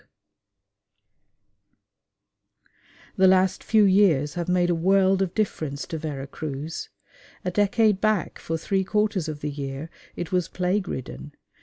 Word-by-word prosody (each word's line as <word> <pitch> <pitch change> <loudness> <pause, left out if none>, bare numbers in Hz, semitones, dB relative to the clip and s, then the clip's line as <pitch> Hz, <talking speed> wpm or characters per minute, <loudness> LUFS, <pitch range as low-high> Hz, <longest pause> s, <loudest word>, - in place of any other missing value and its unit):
The 190 0 +6
last 185 0 +3
few 220 -1 +4
years 185 -8 +4
have 175 0 -3
made 175 -1 +2
a - - +3
world 190 +3 +3
of 185 -3 -1
difference 155 -9 -2
to 160 - -5
Vera 145 -3 -5
Cruz. 150 +2 -6 0.6
A 180 - 0
decade 205 +1 +2
back 215 -5 0
for 165 - -3
three 190 +4 0
quarters 205 -3 0
of 150 -2 -6
the 150 - -3
year 140 +2 -6 0.2
it 175 - -5
was 180 -2 +1
plague 185 +2 -1
ridden. 140 +2 -6
180 Hz, 135 wpm, -25 LUFS, 155-195 Hz, 0.6 s, The